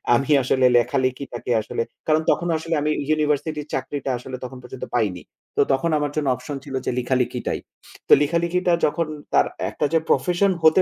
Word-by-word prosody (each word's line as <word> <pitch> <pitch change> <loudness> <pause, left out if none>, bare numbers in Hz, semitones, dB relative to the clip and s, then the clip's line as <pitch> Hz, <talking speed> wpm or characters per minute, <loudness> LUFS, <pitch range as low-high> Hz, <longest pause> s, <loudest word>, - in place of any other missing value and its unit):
আমি 135 +5 0
আসলে 130 +1 +2
লেখালেখিটাকে 130 0 -1
আসলে 110 - -3 0.3
কারণ 155 0 +3
তখনও 170 -1 0
আসলে 165 +1 -2
আমি 150 - +1 0.2
ইউনিভার্সিটির 150 0 0
চাকরিটা 140 -2 -2
আসলে 130 +1 -7
তখন 130 +1 -7
পর্যন্ত 125 +1 -7
পাইনি। 100 -7 0 0.4
তো - - +5
তখন 135 +5 +1
আমার 145 -1 -1
জন্য 150 -2 -1
অপশন 145 +2 -6
ছিল 135 -2 -6
যে - - 0
লেখালিখিটাই। 125 0 -1 0.5
তো - - +7
লেখালেখিটা 170 +4 +1
যখন 165 +2 0 0.3
তার - - +4 0.2
একটা - - -2
যে 165 - +5
প্রফেশন 180 +2 +3
হতে 160 +4 +6
145 Hz, 165 wpm, -23 LUFS, 130-160 Hz, 0.5 s, তো